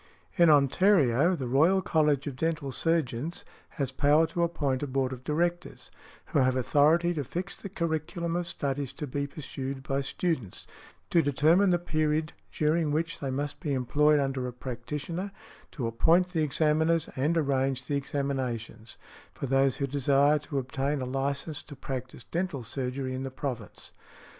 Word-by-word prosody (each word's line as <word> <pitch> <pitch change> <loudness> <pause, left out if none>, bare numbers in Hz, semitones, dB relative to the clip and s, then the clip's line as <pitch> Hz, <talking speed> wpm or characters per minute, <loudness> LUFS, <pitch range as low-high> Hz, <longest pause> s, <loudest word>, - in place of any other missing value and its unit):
In 170 -3 +6
Ontario, 150 - +4
"The 135 -6 -4
Royal 160 +10 +4
College 150 -3 +2
of 140 -3 -4
Dental 155 -2 -2
Surgeons" 160 0 -1 0.3
has 135 -3 -1
power 145 +4 +4
to 170 - -3
appoint 145 -6 0
a 145 - -2
Board 130 -1 -1
of 125 0 -9
Directors, 175 +4 -2 0.4
who - - +4
have 130 -1 +3
authority 155 +7 +3
to 150 -4 -2
fix 180 +9 -5
the 200 - -8
curriculum 170 -1 -2
of 175 -1 -1
studies 140 -4 -3
to 150 +2 -5
be 140 +1 -3
pursued 135 -2 -6
by 135 0 -1
students, 135 - -3 0.5
to 170 - +5
determine 160 +7 +3
the 175 - +4
period 155 -2 -1 0.2
during 155 +1 +1
which 165 +5 -1
they 135 - -3
must 145 +2 -3
be 150 -6 -2
employed 150 +4 +3
under 135 -2 -1
a 125 - -6
practitioner, 150 +10 -5 0.4
to 125 - -4
appoint 165 +11 +3
the 170 -3 -1
examiners, 155 +2 +2
and 150 +6 +1
arrange 135 -3 +1
the 145 - -1
examinations, 130 -5 -3 0.4
for - - -4
those 135 0 +2
who 140 - 0
desire 140 +2 +3
to 145 -1 -5
obtain 135 +2 -1
a - - -2
license 140 +3 -2
to 145 - -11
practise 130 -2 -6
dental 170 -7 -3
surgery 130 +2 -3
in 130 - -4
the 135 - -3
province. 130 -4 -6
145 Hz, 160 wpm, -28 LUFS, 135-165 Hz, 0.5 s, In